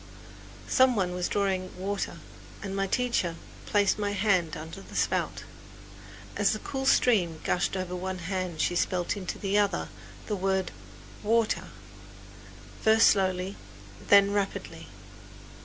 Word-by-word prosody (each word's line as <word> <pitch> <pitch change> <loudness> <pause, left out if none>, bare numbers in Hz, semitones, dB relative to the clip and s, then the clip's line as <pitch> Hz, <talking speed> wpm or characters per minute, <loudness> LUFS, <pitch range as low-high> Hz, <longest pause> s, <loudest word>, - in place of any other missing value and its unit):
Some 260 -1 +4
one 185 -4 0
was 180 0 -1
drawing 190 -3 -1
water 195 +2 -3 0.5
and 195 -1 -4
my 195 0 0
teacher 235 -7 0 0.3
placed 205 0 +2
my 205 -1 -1
hand 185 -5 +1
under 160 +5 -8
the - - -13
spout. - - 0 0.9
As - - +2
the - - -2
cool 270 -1 -4
stream 180 -13 +3
gushed 180 +1 0
over 185 -1 -3
one 185 +1 -4
hand 180 -2 -3
she 175 - +1
spelled 175 0 0
into 195 -3 -5
the 200 +1 +1
other 205 -1 0 0.4
the 210 - -2
word 190 -1 0 0.5
water, 225 +1 +1 1.2
first 220 0 +6
slowly, 190 0 0 0.5
then 200 0 +6
rapidly. 200 -1 -3
195 Hz, 130 wpm, -28 LUFS, 180-205 Hz, 1.2 s, first